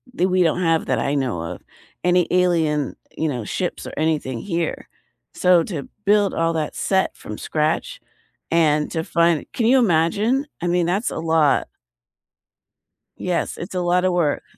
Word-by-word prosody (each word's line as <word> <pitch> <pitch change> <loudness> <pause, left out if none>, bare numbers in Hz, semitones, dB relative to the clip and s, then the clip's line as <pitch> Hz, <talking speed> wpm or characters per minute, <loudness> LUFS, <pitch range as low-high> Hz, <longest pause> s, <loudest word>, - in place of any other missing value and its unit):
that 180 - +2
we 185 0 +3
don't 170 +2 +1
have 165 -2 +1
that - - +1
I 140 - 0
know 125 - -1
of- 85 - -6 0.4
any 180 0 +3
alien, 165 -6 +1 0.2
you 160 - 0
know, 125 -6 -4
ships - - -3
or - - -8
anything 150 -6 -1
here. 170 -4 -3 0.5
So, 180 -2 +4
to 160 -8 -5 0.2
build 205 -1 +3
all 165 0 +1
that 155 -2 -3
set 190 -1 0
from 105 - -8
scratch 160 - -2 0.5
and 155 -2 +2
to 160 - -2
find 170 -2 +2
Can 230 - +1
you 260 +2 +5
imagine? 215 - +2
I 175 - -1
mean, 175 0 +2
that's 195 +6 0
a - - -4
lot. 160 -3 +2 1.5
Yes, 180 -1 -2
it's 175 +2 -7
a - - 0
lot 180 +1 +2
of 185 - +2
work. 160 -5 +1
170 Hz, 170 wpm, -21 LUFS, 155-180 Hz, 1.5 s, you